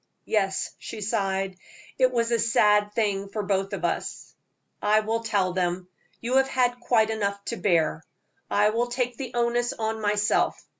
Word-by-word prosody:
"Yes," 195 -3 0
she 225 - -7
sighed, 195 -3 -1 0.4
"it 255 -1 +4
was 235 -1 0
a 235 - +2
sad 210 -2 +3
thing 200 -3 0
for 210 +1 -3
both 195 0 0
of 200 - -3
us." - - -3 0.5
"I 215 +1 +4
will 225 +1 -1
tell 200 -5 0
them. 180 0 -1 0.3
You 245 +3 0
have 270 0 +4
had 245 -2 +1
quite 225 -2 +2
enough 200 -2 -2
to 235 - -3
bear. 165 -5 +1 0.5
I 210 +1 +3
will 235 +2 0
take 245 -1 -2
the 260 -3 -5
onus 240 0 +1
on 220 0 -3
myself. 210 0 +1
215 Hz, 165 wpm, -26 LUFS, 200-235 Hz, 0.5 s, it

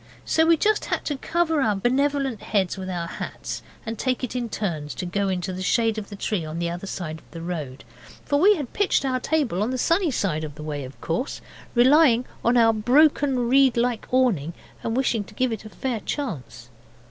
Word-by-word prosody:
So 320 0 +3
we 335 - +7
had - - -13
just 430 0 +2
to 290 - -2
cover 325 +1 +1
our 215 -5 +2
benevolent 265 +2 0
heads 195 -4 0
with 190 -1 -6
our 175 -2 -2
hats, 170 - -6 0.2
and 225 0 -5
take 255 -1 -1
it 255 - -3
in 240 -2 -2
turns 155 - -3
to 180 - -4
go 195 +2 -1
into 185 0 -2
the 185 - -5
shadow 225 +2 +1
of 200 - -12
the 205 - -7
tree 200 -2 -2
on 155 +1 -6
the 170 0 -1
other 175 +3 -6
side 160 -5 -5
of - - -25
the 165 - -8
road. 155 -7 -5 0.4
For 285 - +2
we 410 +6 +6
had 285 -8 -5
pitched 405 -8 +2
our 255 -1 0
table 260 - 0
on 215 - +1
the 255 - -2
sunny 335 +7 +2
side 185 - -1
of 150 -2 -6
the 155 - -8
way, 145 -3 -4
of 130 - -12
course, 170 +11 -2 0.4
relying 255 -1 +5 0.2
on 240 +1 +3
our 225 -1 +5
broken 260 +2 +3
reed 265 -1 +4
like 240 -1 0
awning, 200 - +2 0.3
and 230 +1 -2
wishing 240 -5 +1
to - - -16
give 255 -2 +1
it 220 -1 -5
a - - -8
fair 245 +1 -3
chance. 130 - -5
225 Hz, 215 wpm, -24 LUFS, 180-265 Hz, 0.4 s, we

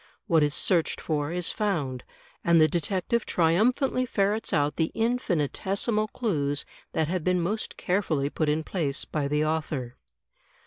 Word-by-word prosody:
What 165 -7 +3
is 145 0 +2
searched 170 -4 +1
for 150 -1 -2
is 175 0 -1
found, 150 - -2 0.4
and 170 -1 +5
the 155 - +6
detective 185 +7 0
triumphantly 235 - +2
ferrets 205 0 0
out 145 -1 +1
the 160 -1 +1
infinitesimal 215 - 0
clues 150 - -1 0.3
that 160 -1 +1
have 180 0 -2
been 180 +1 +2
most 200 +6 -2
carefully 160 -7 0
put 155 -2 0
in 155 +2 +1
place 155 -6 -1
by 150 -2 -2
the 150 +1 +1
author. 150 -6 -2
170 Hz, 145 wpm, -27 LUFS, 150-200 Hz, 0.4 s, the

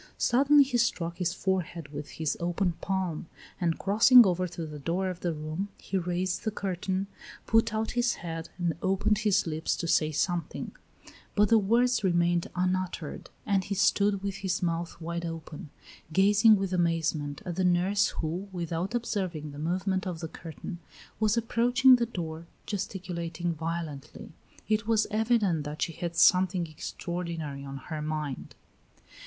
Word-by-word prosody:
Suddenly 280 +4 +5
he 255 -3 -1
struck 170 -7 0
his 175 -2 0
forehead 180 -5 -2
with 145 0 -7
his 160 -2 -1
open 175 +2 0
palm, 185 -4 -2 0.3
and 170 -2 0
crossing 225 +5 +7
over 180 -1 +1
to 170 -1 -6
the 150 -1 -8
door 180 +6 -1
of 180 - -8
the 175 - -1
room, 155 +5 -4
he - - -6
raised 180 0 -1
the 220 - 0
curtain, 190 -1 -2 0.4
put 225 0 +3
out 220 0 -1
his 240 -1 +1
head, 165 -1 -6
and 175 -3 0
opened 195 +2 +1
his 210 -3 +2
lips 160 -1 -1
to 170 - -4
say 155 -2 +3
something; 175 +3 -2 0.6
but 210 -1 +4
the 225 - +6
words 235 +3 +2
remained 175 -2 +2
unuttered, 185 -3 -2 0.2
and 195 -2 +1
he 200 - -2
stood 200 +1 +2
with 200 -1 -3
his 185 -2 -2
mouth 170 0 -2
wide 170 +1 -4
open, 165 -3 -7 0.4
gazing 205 +5 +6
with 195 -2 -2
amazement 165 -4 0
at 175 -2 -4
the 190 - +1
nurse 180 +3 +3
who, 175 +5 -4
without 175 +4 -3
observing 185 -10 -2
the 145 - -9
movement 185 +4 -1
of 175 -3 -4
the 165 - -4
curtain, 165 +2 -8 0.4
was 215 +1 +2
approaching 245 +3 +5
the 235 -1 0
door, 165 -6 -6 0.2
gesticulating 175 -4 -3
violently; 160 -3 -5 0.4
it 215 0 0
was 225 -1 +3
evident 215 -7 +2
that 150 +1 -3
she 165 - -2
had 170 +1 -4
something 180 +1 +4
extraordinary 165 -2 -5
on 135 0 -6
her 155 +3 -6
mind. 150 -3 -4
180 Hz, 160 wpm, -28 LUFS, 165-200 Hz, 0.6 s, crossing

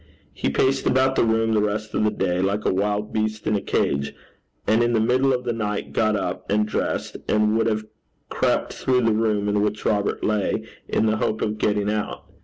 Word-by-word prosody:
He - - -1
paced 135 0 +1
about 130 +1 +3
the - - +3
room 115 0 +2
the 105 - +3
rest 105 +1 -2
of - - +1
the 105 - +3
day 90 -4 -1
like 100 +2 -1
a - - +2
wild 105 +2 -1
beast 110 0 -2
in 105 - +1
a 100 - 0
cage, 70 -6 -1 0.5
and 110 +2 +3
in 120 0 +2
the 115 - +3
middle 130 +4 +3
of 125 -1 0
the 120 -1 -1
night, 105 -2 -3
got 110 -1 +2
up 95 -3 -4
and 105 +1 +2
dressed, 105 - -2
and 105 0 +3
would 115 - +2
have 110 -1 -1 0.4
crept - - 0
through 130 -1 +1
the 115 -2 +2
room 105 -2 +1
in 105 0 +1
which 105 0 -2
Robert 100 -1 0
lay, 105 -2 0 0.2
in - - +1
the 110 0 +2
hope 110 0 -1
of 105 0 -2
getting 105 -1 +1
out. 105 -1 -3
105 Hz, 215 wpm, -23 LUFS, 105-115 Hz, 0.5 s, about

